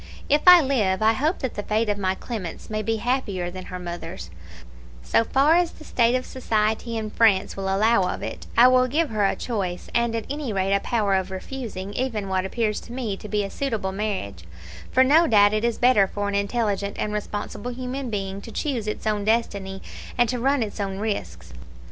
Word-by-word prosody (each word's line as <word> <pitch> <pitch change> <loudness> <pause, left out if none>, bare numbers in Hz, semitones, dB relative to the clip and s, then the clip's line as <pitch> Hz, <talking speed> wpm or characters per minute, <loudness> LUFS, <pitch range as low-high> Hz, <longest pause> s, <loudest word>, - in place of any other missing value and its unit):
If 295 +1 +4
I 360 -1 +11
live, 220 -8 +1
I 220 +1 +5
hope 300 +9 0
that 260 - -1
the - - -4
fate 215 +2 0
of 205 - +1
my 190 -1 0
Clemence 210 -4 -6
may 215 0 -1
be 225 +2 0
happier 210 -7 -1
than 185 0 -8
her 185 - -6
mother's, 170 - -7 0.7
so 225 - +2
far 280 +7 +4
as 350 -1 +2
the - - -13
state 240 -4 +2
of 255 - -1
society 225 -1 -1
in 215 -1 -4
France 210 -5 +3
will 195 - -4
allow 195 0 +2
of - - -6
it: - - -6
I 240 +2 +9
will 255 0 +4
give 305 +2 0
her 210 -2 +2
a - - 0
choice, 190 -7 -4
and, 235 -1 +1
at 225 - -3
any 285 -4 -4
rate, 195 -1 0
a 200 - +3
power 210 -2 0
of 190 0 0
refusing 200 -1 -6
even 220 -6 -2
what 190 0 0
appears 215 +1 -1
to - - -13
me 240 -5 -3
to 210 - -10
be 210 -1 0
a 195 - -5
suitable 225 -9 -2
marriage; 190 - -4 0.5
for 260 - +5
no 315 +6 +5
doubt 205 -2 +5
it 215 +1 0
is 235 -1 0
better 240 -6 +4
for 205 +1 -3
an 200 - -2
intelligent 200 -1 -1
and 210 - -2
responsible 210 +2 -4
human 255 +1 -4
being 195 -2 -4
to 230 - -10
choose 245 -4 -2
its 210 - -4
own 210 -1 0
destiny, 200 -3 -1 0.3
and 240 -1 +4
to 250 - -1
run 270 +1 +2
its 215 0 -7
own 195 -1 -2
risks. 90 - -4
215 Hz, 215 wpm, -24 LUFS, 195-245 Hz, 0.7 s, I